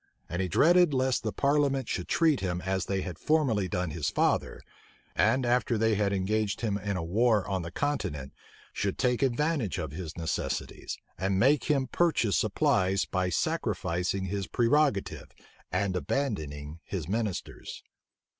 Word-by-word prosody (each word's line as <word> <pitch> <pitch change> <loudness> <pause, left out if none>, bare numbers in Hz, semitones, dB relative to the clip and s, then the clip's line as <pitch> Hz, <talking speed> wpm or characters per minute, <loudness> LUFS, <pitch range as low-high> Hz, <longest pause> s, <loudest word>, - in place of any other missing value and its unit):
And 90 +2 -2
he 95 - 0
dreaded 170 - +4
lest 130 0 +1
the 110 - -2
parliament 140 -2 +1
should 90 - -3
treat 160 -4 +3
him 90 -2 -2
as 95 0 -2
they 95 -1 0
had 90 -4 -6
formerly 135 -11 +2
done 90 -4 -2
his 75 -2 -1
father; - - 0 0.6
and 115 +6 +3
after 120 -1 +2
they 110 +1 +2
had 100 -1 +1
engaged 100 +2 0
him 110 -4 0
in 100 -1 -2
a 85 - -3
war 105 +4 +2
on 95 -2 -1
the 85 - -5
continent, 75 - -3 0.4
should 100 -1 -2
take 125 0 +1
advantage 135 - 0
of 75 - -4
his 80 +1 -7
necessities, 80 -1 -3 0.2
and 95 +1 0
make 135 +5 +4
him 140 -3 +2
purchase 130 - +1
supplies 95 +1 +2
by 95 -1 -1
sacrificing 90 +2 -1
his 95 0 -3
prerogative, 125 - +1 0.4
and 95 +2 0
abandoning 80 - -3
his 90 -6 -5
ministers. 105 -1 -4
100 Hz, 155 wpm, -29 LUFS, 90-130 Hz, 0.6 s, dreaded